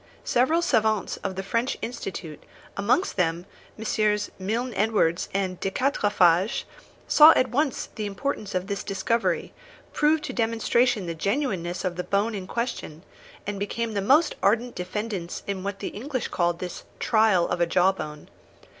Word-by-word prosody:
Several 310 +8 +2
savants 220 - +1
of 190 -2 -4
the 190 - -4
French 230 +6 -1
Institute, 190 -9 -6
and - - -25 0.3
amongst 215 - +1
them 170 -1 0 0.3
MM. 210 -1 0
Milne 230 +6 -2
Edwards 200 -5 +1
and 190 -2 -2
de 195 - -1
Quatrefages, 200 -6 +2 0.4
saw 310 +2 +9
at 255 - +2
once 280 +2 0
the 215 -2 -3
importance 205 -1 -3
of 185 0 0
this 200 0 -3
discovery, 200 +4 -1 0.4
proved 305 +1 +2
to - - -4
demonstration 230 -1 +1
the 170 - -3
genuineness 190 - -2
of 180 -1 -2
the 180 - -2
bone 205 +4 0
in 190 -3 -5
question, 235 -9 -4 0.4
and 205 -1 -4
became 225 +3 -2
the 200 - 0
most 285 - +4
ardent 235 +4 +2
defendants 190 -1 -4
in 195 -2 -3
what 200 0 -3
the - - -4
English 255 +3 -4
called 175 -1 0
this 180 0 -6 0.2
'trial 215 -6 +3
of 175 - -2
a 170 - +3
jawbone.' 175 -4 0
205 Hz, 155 wpm, -25 LUFS, 185-235 Hz, 0.4 s, saw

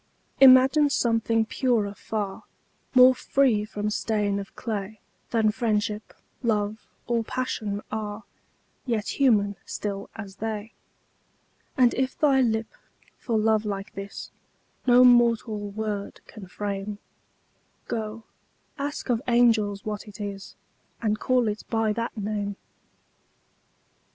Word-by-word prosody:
Imagine 265 +3 +7
something 230 -3 +1
purer 225 -4 0
far, 205 -1 -4 0.5
More 255 0 +8
free 255 -4 +2
from 210 0 -3
stain 210 -2 0
of 195 - -9
clay 215 -2 -4 0.3
Than 220 -2 +2
Friendship, 210 -2 -2 0.3
Love, 215 -2 -1 0.2
or 235 -1 0
Passion 215 -4 -3
are, 210 0 -4 0.6
Yet 225 0 -2
human, 205 -7 +3
still 200 -1 -5
as 200 -3 -9
they: 220 0 -4 1.0
And 250 -2 +5
if 265 0 -1
thy 275 -3 +4
lip, 225 -2 0 0.5
for 230 -4 -1
love 220 0 +2
like 200 -1 -5
this, 195 0 -7 0.6
No 245 0 +7
mortal 230 -4 +3
word 205 -1 -4
can 205 -4 -11
frame, 200 +2 -4 0.9
Go, 220 0 -4 0.6
ask 285 +1 -4
of 235 -1 +1
angels 225 -4 +3
what 210 0 -4
it 205 -1 -12
is, 200 -1 -6 0.4
And 215 -2 0
call 250 -2 +2
it 210 0 -3
by 225 -2 +1
that 230 +1 -4
name! 205 -1 -3
220 Hz, 115 wpm, -26 LUFS, 205-235 Hz, 1.0 s, More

